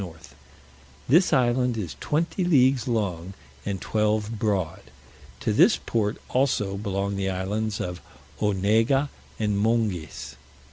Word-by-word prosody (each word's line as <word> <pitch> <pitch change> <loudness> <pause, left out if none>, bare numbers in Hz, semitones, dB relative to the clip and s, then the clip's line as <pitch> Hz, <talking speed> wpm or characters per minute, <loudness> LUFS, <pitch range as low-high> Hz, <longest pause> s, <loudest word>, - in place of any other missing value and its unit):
north. 80 -3 -11 0.7
This 170 +8 +5
island 125 -3 +2
is 95 -7 -4
twenty 165 +4 -1
leagues 130 -7 +3
long, 95 -6 -2 0.3
and 100 -2 -2
twelve 105 +2 0
broad. 95 -7 -1 0.6
To 110 - 0
this 180 - +5
port 105 -2 -1
also 120 -7 +1
belong 100 0 -2
the 95 -1 -1
islands 100 +3 -2
of 90 0 -4 0.4
Onega 110 +7 +2 0.3
and 105 -2 0
Monges. 105 -7 -1
105 Hz, 120 wpm, -25 LUFS, 100-125 Hz, 0.7 s, This